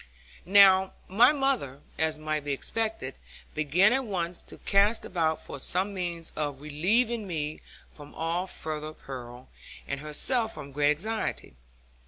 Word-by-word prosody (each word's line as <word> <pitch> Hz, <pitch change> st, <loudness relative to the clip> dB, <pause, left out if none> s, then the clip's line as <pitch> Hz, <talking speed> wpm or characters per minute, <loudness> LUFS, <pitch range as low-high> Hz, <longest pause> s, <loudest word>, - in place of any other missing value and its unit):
Now 190 Hz, -1 st, +6 dB
my 230 Hz, +8 st, +6 dB
mother, 270 Hz, -, -1 dB, 0.2 s
as 160 Hz, -1 st, +2 dB
might 155 Hz, -1 st, -2 dB
be 145 Hz, -1 st, -1 dB
expected, 215 Hz, -3 st, -2 dB, 0.4 s
began 170 Hz, -, +3 dB
at 265 Hz, 0 st, +1 dB
once 180 Hz, -6 st, -3 dB
to -, -, -12 dB
cast 205 Hz, +3 st, +2 dB
about 160 Hz, -3 st, 0 dB
for -, -, -8 dB
some 190 Hz, +8 st, 0 dB
means 170 Hz, -3 st, -3 dB
of 145 Hz, -3 st, -2 dB
relieving 205 Hz, -, 0 dB
me 155 Hz, -3 st, -3 dB, 0.3 s
from 145 Hz, -1 st, -14 dB
all 170 Hz, +3 st, -1 dB
further 155 Hz, -3 st, -3 dB
peril, 125 Hz, -3 st, -9 dB, 0.4 s
and 140 Hz, -, -3 dB
herself 220 Hz, -, 0 dB
from 140 Hz, -, -8 dB
great 145 Hz, +1 st, +2 dB
anxiety. 220 Hz, -, -3 dB
170 Hz, 140 wpm, -28 LUFS, 150-205 Hz, 0.4 s, Now